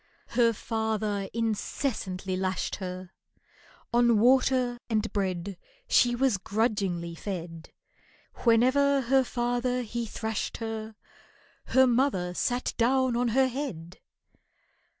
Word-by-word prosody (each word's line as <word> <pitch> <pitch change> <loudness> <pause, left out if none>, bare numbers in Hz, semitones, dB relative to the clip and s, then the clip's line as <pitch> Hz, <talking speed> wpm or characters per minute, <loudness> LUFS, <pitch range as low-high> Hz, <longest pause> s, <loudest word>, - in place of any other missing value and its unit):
Her 235 -1 +3
father 215 -3 -2
incessantly 210 -4 -2
lashed 185 0 -2
her, 185 -1 -6 0.8
On 240 -1 +4
water 250 +1 +3
and 220 -1 -1
bread 190 -2 -2 0.3
She 240 0 +4
was 245 -5 +1
grudgingly 200 -6 -1
fed; 165 -3 -6 0.7
Whenever 260 +4 +3
her 265 +2 +3
father 245 +1 -1
he 235 +1 -4
thrashed 220 -1 -3
her 220 -1 -5 0.7
Her 260 0 +4
mother 240 -8 +1
sat 245 +7 -1
down 255 +1 +2
on 245 +1 +1
her 260 +3 +3
head. 215 - -6
225 Hz, 105 wpm, -28 LUFS, 195-250 Hz, 0.8 s, On